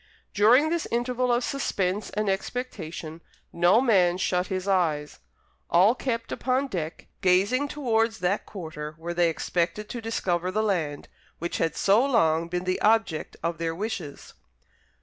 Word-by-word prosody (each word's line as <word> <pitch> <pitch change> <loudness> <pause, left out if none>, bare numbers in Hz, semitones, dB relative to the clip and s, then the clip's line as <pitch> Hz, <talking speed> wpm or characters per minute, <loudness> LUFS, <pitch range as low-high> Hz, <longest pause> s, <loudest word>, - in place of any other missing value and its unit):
During 240 +9 +5
this 340 -1 -1
interval 245 +1 0
of 240 +1 +2
suspense 200 -8 -1
and 210 0 -2
expectation, 180 -6 -4 0.3
no 175 +6 +4
man 190 -8 +3
shut 180 -1 0
his 185 0 -3
eyes, 160 -6 0 0.5
all 185 +6 +5
kept 230 -3 -3
upon 260 +2 0
deck, 165 -7 -5 0.2
gazing 200 +10 +3
towards 225 -6 0
that 195 +1 -1
quarter 155 -5 -7
where 170 +2 -5
they 175 -1 +3
expected 175 +5 -2
to 240 - -5
discover 185 -6 -1
the 215 +4 0
land, 165 -9 -1 0.3
which 170 +1 -4
had 165 -1 0
so 205 +5 +4
long 165 - +2
been 175 +1 -3
the 185 0 -1
object 215 -7 +1
of 165 -1 -2
their 165 -1 -2
wishes. 185 -7 -5
190 Hz, 150 wpm, -26 LUFS, 170-230 Hz, 0.5 s, During